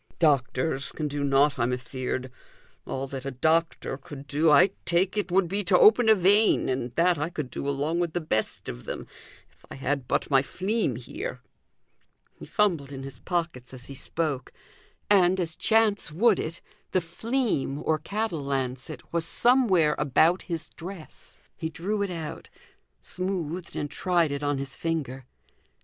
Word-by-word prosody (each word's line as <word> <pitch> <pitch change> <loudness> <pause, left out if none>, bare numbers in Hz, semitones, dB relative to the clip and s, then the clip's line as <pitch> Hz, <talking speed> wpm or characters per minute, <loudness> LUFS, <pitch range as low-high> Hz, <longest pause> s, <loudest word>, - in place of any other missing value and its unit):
"Doctors 140 -1 +1
can 155 - -3
do 145 0 -3
nought, 140 0 +3
I'm 120 +1 +1
afeard. 130 0 -3 0.6
All 135 +1 -3
that 135 -1 -6
a 140 - -3
doctor 160 +1 0
could 140 0 -10
do, 150 +3 +2
I 150 +6 +6
take 180 +3 +1
it, 205 -3 -1
would 185 0 +3
be 200 +4 -1
to 180 0 +5
open 220 +3 +6
a 220 - +8
vein, 205 0 +4
and 130 -2 -2
that 170 -1 +3
I 150 +3 -1
could 150 -7 -5
do 140 - -3
along 145 +5 0
with 170 -2 -1
the 175 - 0
best 130 -10 -2
of - - -7
them, - - -5 0.5
if - - -31
I - - -8
had 135 -1 -2
but - - 0
my 135 -1 +6
fleam 200 +10 -1
here." - - -6 0.9
He - - -12
fumbled 170 -10 +1
in 135 -1 -6
his 135 -3 -8
pockets 160 -8 -3
as 125 -1 -9
he 140 - -9
spoke, 140 -1 -3 0.6
and, 190 -2 +4
as 165 -2 -2
chance 220 -6 +2
would 205 +5 +3
it, 165 +2 -4 0.3
the 185 - +4
"fleam" 175 - -1
(or 155 -1 +2
cattle 200 -2 -2
lancet) 130 0 -4
was 170 -1 +1
somewhere 195 -9 +3
about 155 +5 +3
his 165 -3 -4
dress. 175 -1 -10 0.2
He 160 - -4
drew 200 +6 -2
it 200 - 0
out, 165 -4 -6 0.5
smoothed 180 -2 -3
and 145 - -2
tried 170 0 +1
it 140 0 -3
on 145 -1 0
his 135 -2 -5
finger. 135 -6 -3
160 Hz, 170 wpm, -27 LUFS, 135-180 Hz, 0.9 s, a